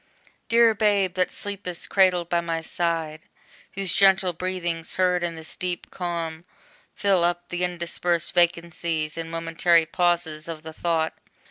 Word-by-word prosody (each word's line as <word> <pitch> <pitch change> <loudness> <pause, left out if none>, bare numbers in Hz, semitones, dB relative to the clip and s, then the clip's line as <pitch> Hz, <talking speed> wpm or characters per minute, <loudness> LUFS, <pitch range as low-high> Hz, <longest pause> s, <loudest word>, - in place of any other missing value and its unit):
Dear 230 -1 +5
Babe, 200 -3 +2
that 185 0 0
sleepest 200 -4 -4
cradled 185 -3 +3
by 170 0 +1
my 165 -1 -2
side, 160 -2 -2 0.5
Whose 195 -3 0
gentle 195 -2 +4
breathings, 175 -2 -3
heard 180 -1 +2
in 170 -1 -2
this 160 -1 -8
deep 180 -1 -4
calm, 170 -2 -4 0.5
Fill 195 -4 +2
up 175 0 -1
the 175 0 -2
interspersed 175 -1 -1
vacancies 170 -2 0
And 165 -1 -5
momentary 165 0 +2
pauses 170 -2 0
of 165 -2 -7
the 160 0 -8
thought! 160 -1 0
175 Hz, 140 wpm, -24 LUFS, 165-180 Hz, 0.5 s, Dear